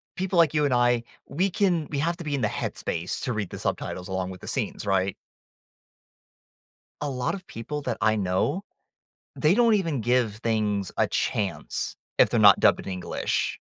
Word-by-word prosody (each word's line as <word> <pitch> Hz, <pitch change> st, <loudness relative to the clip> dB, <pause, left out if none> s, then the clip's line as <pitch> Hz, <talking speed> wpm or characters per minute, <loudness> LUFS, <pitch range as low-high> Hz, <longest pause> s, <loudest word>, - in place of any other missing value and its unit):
people 185 Hz, 0 st, -1 dB
like 165 Hz, -3 st, +5 dB
you 150 Hz, -1 st, +2 dB
and 140 Hz, -, +1 dB
I, 120 Hz, -1 st, +3 dB, 0.2 s
we 185 Hz, +6 st, 0 dB
can 175 Hz, -5 st, +1 dB
we 140 Hz, -, -2 dB
have 170 Hz, +3 st, 0 dB
to 175 Hz, -, -7 dB
be 150 Hz, -2 st, -1 dB
in 135 Hz, -, -2 dB
the 110 Hz, -, +2 dB
headspace 85 Hz, -3 st, -3 dB
to 125 Hz, -, -1 dB
read 105 Hz, -3 st, -3 dB
the -, -, -7 dB
subtitles 90 Hz, 0 st, -3 dB
along 95 Hz, -1 st, -2 dB
with 90 Hz, -, -10 dB
the -, -, -9 dB
scenes, -, -, -2 dB
right? 95 Hz, -1 st, +1 dB, 1.9 s
A 145 Hz, -, -1 dB
lot 125 Hz, -2 st, -1 dB
of 190 Hz, -2 st, -8 dB
people 145 Hz, +7 st, -5 dB
that 125 Hz, -4 st, -2 dB
I 110 Hz, 0 st, +3 dB
know, 95 Hz, -, 0 dB, 0.8 s
they 155 Hz, +3 st, +3 dB
don't 235 Hz, 0 st, +4 dB
even 165 Hz, -, +1 dB
give 120 Hz, -2 st, +1 dB
things 105 Hz, -4 st, -1 dB
a -, -, +4 dB
chance 95 Hz, -8 st, -2 dB, 0.2 s
if -, -, +6 dB
they're -, -, 0 dB
not -, -, +7 dB
dubbed -, -, +5 dB
in 95 Hz, -, -3 dB
English. 90 Hz, -1 st, -2 dB
120 Hz, 190 wpm, -26 LUFS, 100-160 Hz, 1.9 s, not